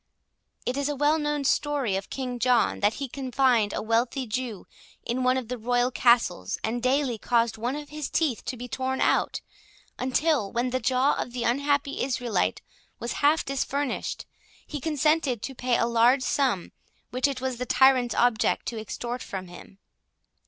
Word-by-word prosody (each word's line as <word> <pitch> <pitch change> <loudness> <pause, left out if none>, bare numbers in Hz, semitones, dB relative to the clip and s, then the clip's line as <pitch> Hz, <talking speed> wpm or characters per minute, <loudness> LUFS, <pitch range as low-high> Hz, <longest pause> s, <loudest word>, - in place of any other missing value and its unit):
It 255 - -1
is 280 0 0
a 290 - -1
well 295 +3 +2
known 295 -1 -1
story 275 -6 +1
of 195 0 -4
King 250 -2 -4
John, 250 -2 +2
that 205 +2 +2
he 275 - -4
confined 255 -4 +1
a - - -3
wealthy 235 +4 0
Jew 230 -3 -4 0.4
in 245 +2 -1
one 255 +1 +3
of 255 -3 -4
the 250 0 -5
royal 245 +2 +1
castles, 235 - +2
and 235 +2 -1
daily 255 -2 +1
caused 230 0 +1
one 245 +4 -1
of 295 -1 -7
his 300 -2 -5
teeth 295 -9 0
to 255 - -4
be 245 +2 -6
torn 260 +2 -2
out, - - +1 0.6
until, 260 -4 +1
when 245 +1 -1
the 255 - 0
jaw 260 +2 +2
of 240 - -6
the 245 -1 -3
unhappy 280 +3 0
Israelite 245 -3 -1 0.3
was 235 - -4
half 295 +3 +3
disfurnished, 275 0 -2 0.4
he 295 -2 -6
consented 300 -5 +1
to 270 - -4
pay 250 -1 0
a - - +2
large 235 +3 +4
sum, 255 -12 0 0.4
which 255 +3 +1
it 275 -2 -3
was 260 -1 -3
the 250 +1 -4
tyrant's 255 -2 +4
object 240 -3 +2
to 230 - -5
extort 240 +3 -5
from 185 -2 -6
him. 175 +2 -13
255 Hz, 175 wpm, -26 LUFS, 235-275 Hz, 0.6 s, large